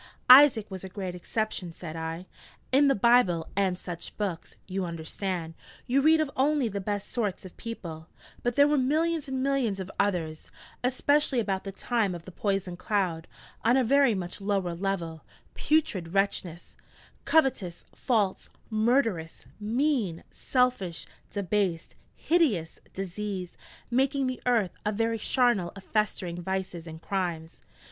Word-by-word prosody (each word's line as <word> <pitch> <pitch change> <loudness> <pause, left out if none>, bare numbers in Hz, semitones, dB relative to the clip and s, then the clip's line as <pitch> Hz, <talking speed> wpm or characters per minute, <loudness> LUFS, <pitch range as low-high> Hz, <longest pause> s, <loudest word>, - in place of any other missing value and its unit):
'Isaac 255 -6 +8
was 190 -1 -6
a 190 - -6
great 185 -1 -5
exception,' 180 -1 -3
said 165 -2 -8
I: 165 +2 -4 0.5
'in 280 +2 +5
the 275 - +4
Bible 200 -7 +4
and 190 -2 +1
such 175 -2 -7
books, 190 -5 -4
you 190 0 -2
understand, 170 0 -4 0.3
you 265 +3 +2
read 315 +2 +5
of 310 -3 0
only 280 -1 +2
the 200 -2 -3
best 205 0 -3
sorts 210 -6 -2
of 185 - -11
people; 170 -9 -7 0.3
but 245 0 -1
there 285 +1 +6
were 295 -1 +3
millions 315 +4 +1
and 265 -1 -2
millions 265 -8 +1
of 190 0 -5
others 170 -6 -1 0.3
especially 265 +1 +2
about 195 -3 -1
the 195 - -4
time 210 -2 0
of 170 - -9
the 185 - -9
poison 195 -1 -1
cloud 180 -6 -1 0.4
on 240 +3 +4
a 260 - +4
very 270 -1 +4
much 180 +1 -4
lower 195 -3 0
level 170 -3 -3 0.3
putrid 210 - 0
wretches 185 -3 -1 0.5
covetous, 255 - +1
false, 210 -7 0 0.2
murderous, 220 -7 +1
mean, 225 - 0
selfish, 250 -10 0 0.2
debased, 195 -4 -1 0.2
hideous, 265 - +1 0.2
diseased, 195 -1 -4 0.4
making 270 +2 +2
the 255 -1 -3
earth 225 -7 +3
a 210 - 0
very 225 +1 0
charnel 240 -7 +2
of 195 - -10
festering 185 -5 -1
vices 185 -2 -4
and 160 0 -9
crimes.' 175 -4 -3
200 Hz, 145 wpm, -28 LUFS, 180-250 Hz, 0.5 s, Isaac